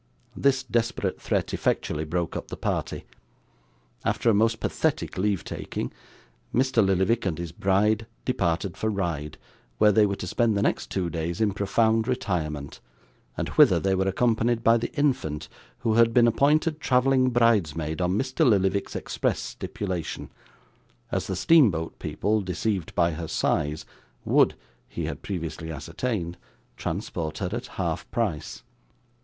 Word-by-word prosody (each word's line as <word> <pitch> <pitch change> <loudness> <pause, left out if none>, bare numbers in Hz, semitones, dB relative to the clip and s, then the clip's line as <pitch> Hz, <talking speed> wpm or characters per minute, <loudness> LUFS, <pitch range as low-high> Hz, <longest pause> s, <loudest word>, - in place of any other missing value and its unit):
This 135 -1 +2
desperate 115 -5 -1
threat - - -1
effectually 75 +1 -1
broke 85 +1 -2
up - - -4
the - - -7
party. - - -3 1.0
After 115 - +2
a - - +2
most 115 +2 +2
pathetic - - -1
leave 95 -1 0
taking, - - -5 0.6
Mr. 130 -2 +3
Lillyvick 95 +5 +2
and 85 - -1
his 85 -2 -5
bride 105 +5 +1 0.2
departed 85 +2 0
for 110 - -1
Ryde, 85 -7 -3 0.4
where 105 - +5
they 105 +1 +5
were 100 - -1
to 95 - -6
spend 110 +3 +1
the 100 - +1
next - - 0
two 90 -3 -2
days 85 +1 -3
in 110 -2 +2
profound 110 +2 +2
retirement, 80 - -2 0.6
and - - -2
whither - - +5
they 95 0 +1
were 95 0 +1
accompanied 115 +3 +1
by 115 - +6
the 115 - -3
infant, 130 - 0 0.3
who 110 - +1
had 115 0 +4
been 120 -1 +7
appointed 150 +6 +2
travelling 130 -1 +3
bridesmaid 90 -10 +1
on 90 +2 +1
Mr. 135 +5 0
Lillyvick's 100 -6 +2
express - - -1
stipulation: 90 -6 -5 0.8
as - - -1
the - - -2
steamboat 105 - +3
people, 105 +1 0
deceived 95 -1 -2
by 85 -1 +3
her 80 +1 -5
size, 75 0 0 0.4
would - - +4 0.3
(he - - -4
had - - -5
previously 85 -3 -5
ascertained) 85 - -3 0.4
transport 80 -2 -4
her 95 -4 -2
at 120 - -4
half 85 -2 -2
price. 100 -6 -2
100 Hz, 145 wpm, -26 LUFS, 85-115 Hz, 1.0 s, been